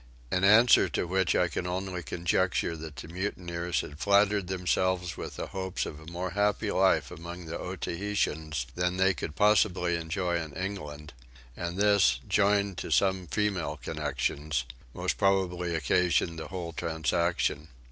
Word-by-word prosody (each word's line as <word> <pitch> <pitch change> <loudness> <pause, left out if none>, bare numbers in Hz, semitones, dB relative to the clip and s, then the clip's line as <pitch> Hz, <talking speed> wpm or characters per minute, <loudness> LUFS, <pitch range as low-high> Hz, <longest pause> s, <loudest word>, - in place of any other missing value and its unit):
in 90 - +1
answer 110 +5 +6
to - - -1
which 95 +1 +1
I 90 - +3
can 90 - -3
only 90 0 -3
conjecture 85 +1 0
that 80 -2 -8
the 70 - -8
mutineers 85 -3 -2
had 75 +1 -10
flattered 100 -1 +3
themselves 90 -1 0
with - - -7
the - - -4
hopes 95 -1 -3
of 75 - -7
a 80 - -14
more 90 +1 -4
happy 105 +2 +1
life - - +3
among 85 +1 -8
the 80 - -5
Otaheiteans 80 -7 -2
than 90 +1 -1
they 95 0 +4
could 75 - -6
possibly 95 -4 +3
enjoy 85 +1 -1
in 80 -3 -6
England; 75 -6 -5 0.4
and 85 +1 -4
this, 100 -1 +4
joined 100 -1 +2
to - - -5
some 95 -2 +2
female 90 -6 -1
connections, 75 -1 -2 0.3
most - - -2
probably 90 -3 +1
occasioned 85 +2 +1
the 80 - -6
whole 85 -2 -5
transaction. 80 -1 0
90 Hz, 150 wpm, -29 LUFS, 80-95 Hz, 0.4 s, answer